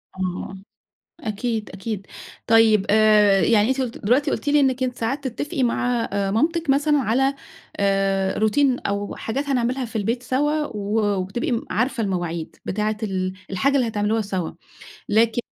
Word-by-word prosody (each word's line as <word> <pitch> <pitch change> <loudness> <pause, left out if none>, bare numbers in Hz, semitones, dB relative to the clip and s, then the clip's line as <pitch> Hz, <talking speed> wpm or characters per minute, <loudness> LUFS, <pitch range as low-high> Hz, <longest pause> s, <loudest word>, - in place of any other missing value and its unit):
آه، - - -13
آه، 185 +1 -4 0.6
أكيد، 220 -3 -3
أكيد. 195 0 -5 0.4
طيب 225 -3 +5
آآ 210 -2 +5
يعني 215 0 +3
أنتِ 265 0 +1
قُلتِ 245 -3 -4
دلوقتي 250 +7 +1
قُلتِ - - -3
لي 295 +1 +4
إنِّك 260 -2 +2
أنتِ 250 -1 -2
ساعات 270 +5 -2
تتّفقي 265 +2 -3
مع 245 0 0
آآ 200 -1 0
مامتِك 320 - 0
مثلًا 290 +2 +3
على 265 +3 +1 0.4
آآ 195 -1 +1
Routine 250 +4 +3
أو 200 0 -3
حاجات 270 +6 -3
هنعملها 255 0 0
في 230 0 -13
البيت 230 +4 -1
سوا، 295 +5 0
و 210 -2 -2 0.2
وبتبقي 195 +8 -3
م 235 - -1
عارفة 235 +2 0
المواعيد، 175 -4 -3
بتاعة 210 +2 -1
ال 185 -2 -2 0.2
الحاجة 270 +9 +1
اللي 255 -4 +2
هتعملوها 215 +1 0
سوّا، 190 -5 -3 0.6
لكن 225 +2 +3
225 Hz, 160 wpm, -22 LUFS, 200-260 Hz, 0.6 s, طيب